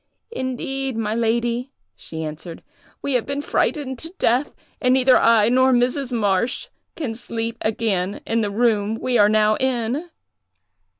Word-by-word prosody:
'Indeed, 265 - -3
my 215 -1 -1
lady,' 235 +2 0 0.3
she 160 0 -7
answered, 160 +2 -7 0.4
'we 280 - -1
have 245 -3 0
been 280 0 -2
frightened 285 -3 -1
to 325 - -4
death, 250 +5 +1 0.3
and 255 0 +4
neither 260 0 +5
I 225 -2 +5
nor 260 +2 +4
Mrs. 250 +2 +1
Marsh 210 0 0 0.3
can 275 -8 -3
sleep 230 0 -4
again 205 -3 -1
in 230 0 0
the 210 - 0
room 215 -1 +1
we 245 +1 0
are 205 0 +6
now 215 0 +3
in. 260 +5 -1
235 Hz, 145 wpm, -22 LUFS, 215-260 Hz, 0.4 s, are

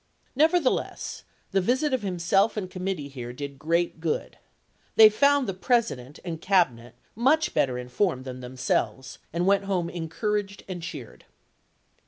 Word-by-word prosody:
Never 320 +6 +4
theless 270 -6 -2 0.3
the 195 -1 +2
visit 260 +8 +1
of 260 - +1
himself 195 +3 +1
and 185 -3 -4
committee 185 -5 -3
here 125 -4 -7
did 140 +2 -7
great 170 +2 0
good. 160 -1 -3 0.6
They 220 -1 +10
found 280 +5 +3
the 195 - -1
President 185 - 0
and 165 -2 -5
Cabinet 125 - +1
j. - - -38
g. - - -39 0.2
n., - - -4
much 305 +4 +3
better 135 -5 +1
informed 130 +3 -1
than 130 -1 -6
themselves, 130 +1 -2
and 170 +2 -1
went 200 +1 +4
Mem 200 - -9
a - - +1
home 170 -2 -1
encouraged 195 +4 -3
and 180 -2 -5
cheered." 145 -8 -8
180 Hz, 170 wpm, -26 LUFS, 140-210 Hz, 0.6 s, They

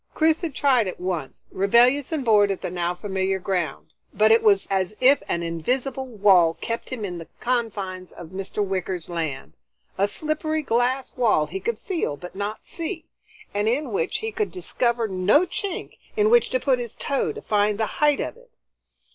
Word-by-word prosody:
Chris 320 0 +3
had 325 -6 -4
tried 255 -7 +3
it 185 - -5
once, 175 -6 -4
rebellious 245 - +3
and 300 -5 -2
bored 210 -3 +5
at 195 - -2
the - - -4
now 175 0 -1
familiar 190 0 -1
ground, 175 -5 -3 0.2
but 215 +2 +4
it 225 - +6
was 200 -3 +4
as 195 +2 0
if 270 +3 +5
an 170 - -1
invisible 250 - -2
wall 195 -8 +4
kept 230 0 -4
him 240 -5 -4
in 175 -3 -5
the 165 - -9
confines 200 -7 -2
of 170 -2 -10
Mr. 195 +2 -3
Wicker's 185 -3 -3
land, 160 -6 -4 0.5
a 200 - +4
slippery 310 +6 -2
glass 250 +1 0
wall 225 -11 +3
he 180 +6 -5
could 225 +3 -2
feel 325 - -2
but 180 +4 -9
not 205 +2 -4
see, 330 0 -5 0.5
and 205 +2 +1
in 285 +6 -1
which 460 +4 0
he 445 - -2
could 425 -1 -2
discover 235 -10 -1
no 200 - +3
chink 370 +1 -5 0.2
in 425 +1 +4
which 480 0 +5
to - - +1
put 265 - +2
his 235 -2 -6
toe 275 -2 -1
to - - -8
find 210 -1 +2
the 220 - +1 0.2
height 295 -1 +4
of - - -3
it. - - -20
215 Hz, 190 wpm, -24 LUFS, 185-275 Hz, 0.5 s, it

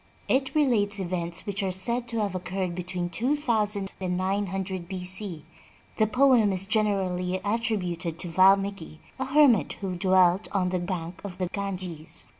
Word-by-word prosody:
It 265 +3 +1
relates 215 -9 +2
events 175 -2 -3
which 200 0 -3
are 190 -1 -1
said 235 +6 -1
to 230 -2 0
have 200 -3 -1
occurred 185 0 -3
between 180 0 -3
two 250 - +1
thousand 210 -8 +1
and 180 -1 -1
nine 195 +2 0
hundred 190 -1 -4
B. 185 -1 -5
C. 185 -4 -2 0.5
The 215 - +3
poem 250 -2 +4
is 190 0 +2
generally 190 -4 0
attrib 220 -1 0
uted 170 -1 -4
to 180 - -1
Valmiki, 190 -2 +2 0.2
a 265 - -1
hermit 265 - +4
who 195 -2 -5
dwelt 185 +1 +3
on 185 -2 +1
the 180 0 -1
bank 175 -1 -5
of 190 -3 -7
the 180 -2 -2
Ganges. 185 -6 -5
190 Hz, 170 wpm, -26 LUFS, 180-210 Hz, 0.5 s, poem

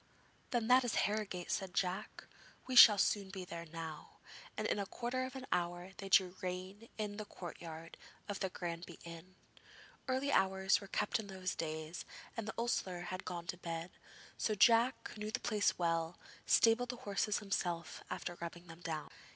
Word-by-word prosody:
'Then 235 -3 0
that 255 +1 +7
is 245 - -1
Harrogate,' 205 -4 -2
said 190 -2 -2
Jack. 190 +3 -1 0.4
'We 260 - -3
shall 215 -4 +11
soon 200 0 +2
be 190 -1 -6
there 170 -1 -7
now,' 160 -1 -7 0.4
and - - -1
in - - +1
a 200 - -2
quarter 250 +4 -2
of 260 +1 -7
an 260 -1 -6
hour 175 +1 -1
they 195 - -6
drew 185 -1 +5
rein 185 +4 -5
in 210 -1 -3
the 215 - -4
courtyard 165 -3 -8 0.3
of 205 -2 -3
the 190 - 0
Granby 170 -1 -5
inn. 170 +2 -10 0.7
Early 265 +2 +1
hours 190 -2 +3
were 200 - -9
kept 210 +4 0
in 215 - -5
those 185 -1 -3
days 160 +1 -4 0.3
and 230 -2 -4
the - - -3
ostler 195 -6 0
had 185 0 -5
gone 175 -2 -4
to 180 0 -4
bed, 170 0 -4 0.5
so 215 - +1
Jack, 235 +4 +5
who 210 - -10
knew 210 - -2
the - - -1
place 210 -3 +1
well, 165 -1 0 0.3
stabled 235 +2 +5
the 250 - -2
horses 205 +1 +1
himself 180 -4 -2
after 175 - -4
rubbing 170 +1 -6
them 165 0 -12
down. 160 -3 -4
190 Hz, 180 wpm, -36 LUFS, 175-215 Hz, 0.7 s, shall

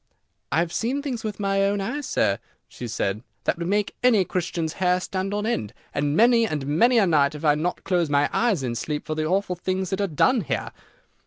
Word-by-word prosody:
"I 140 - +1
have 170 0 0
seen 265 +5 -1
things 255 -6 -4
with 215 -1 -4
my 195 -1 +1
own 200 +1 +1
eyes, 280 +9 -3
sir," 100 0 +1 0.3
she 125 - -8
said, 105 -2 -2 0.2
"that - - 0
would 170 - -2
make 205 +2 0
any 225 -7 +4
Christian's 170 -3 -2
hair 180 0 +3
stand 190 +1 -3
on 205 +1 -1
end, 115 - -2 0.2
and 145 +1 0
many 230 0 +5
and 150 -7 -3
many 230 - +3
a 215 - +5
night 150 -4 +3
I 150 0 +1
have 150 - 0
not 180 +3 -2
closed 175 -4 +1
my 145 0 +3
eyes 215 - +1
in 120 -2 -2
sleep 150 +5 -3
for 155 - -2
the 155 0 -1
awful 185 +1 0
things 185 +1 -2
that 190 +1 -1
are 200 - +1
done 225 - +2
here." 165 - -3
180 Hz, 225 wpm, -24 LUFS, 150-205 Hz, 0.3 s, many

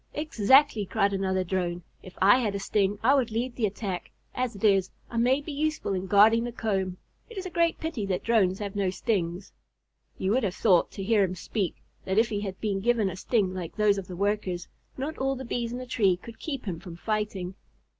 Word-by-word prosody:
"Exactly!" 270 -4 +4
cried 200 +1 +1
another 190 -1 0
Drone. 175 -1 -2 0.2
"If 185 - -13
I 205 +6 +7
had 210 -5 -1
a - - -2
sting, 200 0 +1
I 260 +4 +5
would 265 -5 +2
lead 235 +3 -2
the 225 -4 +1
attack. 195 -2 -5 0.2
As 250 -3 -2
it 200 - -11
is, 195 -3 +4 0.2
I 235 - -4
may 255 +4 +3
be 305 - -7
useful 305 -6 -1
in 190 0 -3
guarding 215 +4 +6
the 240 - -3
comb. 195 -5 -2 0.3
It 460 - -11
is 380 - -4
a 370 - -5
great 335 0 +1
pity 295 -11 -3
that 185 -2 -1
Drones 200 -5 +3
have 205 -1 -5
no 195 -2 +1
stings." 185 -2 -2 0.6
You 190 - 0
would 255 +4 +3
have 195 -5 -1
thought, 185 -6 +4
to 195 - -5
hear 210 0 +3
him 185 -1 -1
speak, 185 0 -3 0.2
that 190 +1 -1
if 225 +1 +4
he 205 - -2
had 195 -2 -5
been 205 -3 -1
given 220 -2 +2
a - - -7
sting 190 -1 0
like 180 -3 -6
those 210 -2 +3
of 185 - -8
the 180 - -7
Workers, 195 -2 -1 0.3
not 285 +4 -4
all 270 0 0
the 265 0 -7
Bees 235 -1 -2
in 245 - -4
the 255 - -6
tree 200 -7 +2
could 225 +4 -12
keep 275 -6 -5
him 175 -5 -4
from 175 -2 -9
fighting. 210 -2 -2
205 Hz, 225 wpm, -27 LUFS, 190-240 Hz, 0.6 s, I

